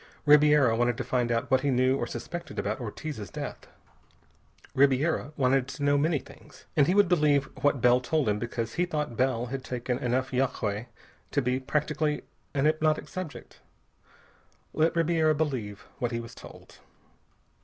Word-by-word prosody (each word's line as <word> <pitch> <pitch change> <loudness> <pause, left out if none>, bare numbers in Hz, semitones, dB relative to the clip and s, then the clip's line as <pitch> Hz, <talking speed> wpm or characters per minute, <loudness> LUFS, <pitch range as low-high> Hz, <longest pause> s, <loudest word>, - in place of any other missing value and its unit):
Ribiera 150 -5 +6
wanted 120 0 +1
to - - -2
find 125 -2 0
out 120 +3 -1
what 130 0 +4
he 145 - 0
knew 130 0 +3
or 120 -3 -2
suspected 155 +6 -7
about 105 +2 -2
Ortiz's 120 0 -6
death. - - -7 1.1
Ribiera 140 +3 +2
wanted 130 -1 +2
to 145 +1 -6
know 145 0 +3
many 150 +2 +2
things, - - -14
and 145 -2 +4
he 180 - +2
would 205 -2 +5
believe 150 -5 +3 0.2
what 145 -3 +2
Bell 125 +1 +5
told 150 +1 0
him 105 0 +1
because 115 -1 -4
he 180 - +1
thought 150 -7 -3
Bell 125 -2 +1
had 135 -1 -4
taken 125 0 -3
enough 130 +2 -1
yagué 120 -4 -1 0.4
to 145 - +1
be 125 +1 0
practically 150 +2 -1 0.3
an 135 +1 +2
hypnotic 155 0 +1
subject. 185 -6 -8 1.1
Let 160 +2 +2
Ribiera 165 -2 +2
believe 125 -10 -3
what 120 -3 -1
he 115 - -2
was 115 +1 -9
told! - - -14
135 Hz, 165 wpm, -28 LUFS, 120-150 Hz, 1.1 s, Ribiera